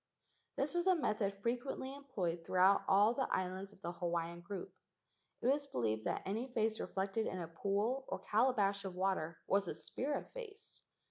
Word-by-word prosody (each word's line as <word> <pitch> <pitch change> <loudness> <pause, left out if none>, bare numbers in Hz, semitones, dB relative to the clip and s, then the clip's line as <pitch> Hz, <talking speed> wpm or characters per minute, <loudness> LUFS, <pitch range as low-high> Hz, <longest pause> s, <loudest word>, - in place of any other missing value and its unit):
This 280 +4 0
was 350 +1 +1
a 375 - +6
method 210 - 0
frequently 250 +2 -1
employed 195 -12 -3
throughout 185 +3 +5
all 205 +4 +6
the 265 +1 0
islands 185 +2 -1
of 200 - -20
the 170 - -2
Hawaiian 170 -1 -2
group. 185 +1 -6 0.7
It - - +2
was 285 +2 +2
believed 110 - -1
that - - -1
any 220 +6 -1
face 220 -3 0
reflected 195 +3 -1
in 185 - -3
a 170 -2 -3
pool 205 +10 0
or - - -2
calabash 205 -3 +2
of 190 -2 -5
water 180 -3 0
was 200 -1 +2
a - - -3
spirit 285 +3 -3
face. 450 -3 -9
200 Hz, 175 wpm, -37 LUFS, 180-260 Hz, 0.7 s, a